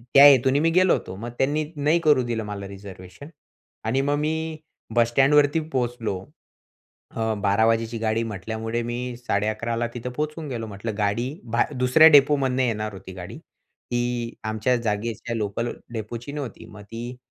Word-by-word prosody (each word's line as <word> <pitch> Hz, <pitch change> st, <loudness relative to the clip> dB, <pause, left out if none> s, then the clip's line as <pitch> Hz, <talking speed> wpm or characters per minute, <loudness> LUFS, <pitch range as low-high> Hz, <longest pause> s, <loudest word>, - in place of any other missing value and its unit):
त्या 125 Hz, +4 st, +6 dB
हेतूने 135 Hz, 0 st, +6 dB
मी 165 Hz, +2 st, +3 dB
गेलो 185 Hz, +2 st, +4 dB
होतो. -, -, -2 dB
मग 115 Hz, +4 st, -6 dB
त्यांनी 150 Hz, +3 st, +1 dB
नाही 150 Hz, +3 st, +3 dB
करू 150 Hz, -4 st, +5 dB
दिलं 115 Hz, -2 st, -2 dB
मला 100 Hz, -1 st, -6 dB
रिझर्वेशन. 95 Hz, -, -11 dB, 0.6 s
आणि 120 Hz, +5 st, +1 dB
मग 145 Hz, +1 st, +1 dB
मी 160 Hz, +1 st, -2 dB, 0.4 s
बस 120 Hz, -1 st, +4 dB
स्टँडवरती 145 Hz, +4 st, +4 dB
पोहचलो. 120 Hz, -6 st, -1 dB, 0.9 s
अ, 110 Hz, -1 st, -1 dB
12:00 105 Hz, +2 st, +3 dB
वाजेची 115 Hz, 0 st, 0 dB
गाडी 110 Hz, 0 st, 0 dB
म्हटल्यामुळे 110 Hz, +2 st, -3 dB
मी 120 Hz, +1 st, -4 dB
11:30 110 Hz, 0 st, -1 dB
ला 120 Hz, 0 st, 0 dB
तिथं 125 Hz, +1 st, -5 dB
पोहोचून 150 Hz, +2 st, -4 dB
गेलो. 115 Hz, -4 st, -4 dB
म्हटलं, 105 Hz, +2 st, -5 dB
गाडी 105 Hz, +4 st, 0 dB, 0.2 s
भा 120 Hz, -, +3 dB
दुसऱ्या 130 Hz, +5 st, +6 dB
डेपोमधनं 140 Hz, -3 st, +4 dB
येणार 110 Hz, -3 st, -1 dB
होती 95 Hz, -1 st, -10 dB
गाडी. 90 Hz, -1 st, -8 dB, 0.5 s
ती 120 Hz, -1 st, -1 dB
आमच्या 110 Hz, +3 st, +1 dB
जागेच्या 115 Hz, 0 st, -3 dB
लोकल 110 Hz, +3 st, -2 dB, 0.2 s
डेपोची 115 Hz, +4 st, -6 dB
नव्हती. 140 Hz, -6 st, -6 dB
मग 105 Hz, -1 st, -12 dB
ती 120 Hz, +2 st, -6 dB
120 Hz, 155 wpm, -24 LUFS, 110-135 Hz, 0.9 s, त्या